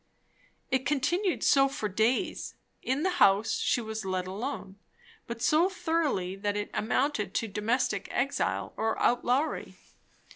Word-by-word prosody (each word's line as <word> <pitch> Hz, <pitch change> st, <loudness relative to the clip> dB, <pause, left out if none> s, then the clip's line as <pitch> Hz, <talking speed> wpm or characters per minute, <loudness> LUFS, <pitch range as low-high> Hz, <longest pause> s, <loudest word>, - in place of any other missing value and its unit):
It 260 Hz, 0 st, +2 dB
continued 345 Hz, +7 st, 0 dB
so 275 Hz, -1 st, +5 dB
for 220 Hz, -5 st, -3 dB
days. 220 Hz, +6 st, 0 dB, 0.3 s
In 265 Hz, +4 st, -1 dB
the 365 Hz, -1 st, 0 dB
house 200 Hz, +2 st, +4 dB
she -, -, +1 dB
was 220 Hz, -1 st, -5 dB
let 185 Hz, -1 st, -2 dB
alone, 200 Hz, 0 st, -5 dB, 0.5 s
but 235 Hz, 0 st, -5 dB
so 320 Hz, +7 st, +4 dB
thoroughly 320 Hz, -, -1 dB
that 205 Hz, +1 st, -1 dB
it 205 Hz, -, -4 dB
amounted 220 Hz, -3 st, 0 dB
to 225 Hz, -, 0 dB
domestic 210 Hz, 0 st, -1 dB
exile 270 Hz, +3 st, -1 dB
or 225 Hz, 0 st, 0 dB
outlawry. 250 Hz, +5 st, 0 dB
235 Hz, 135 wpm, -29 LUFS, 205-285 Hz, 0.5 s, so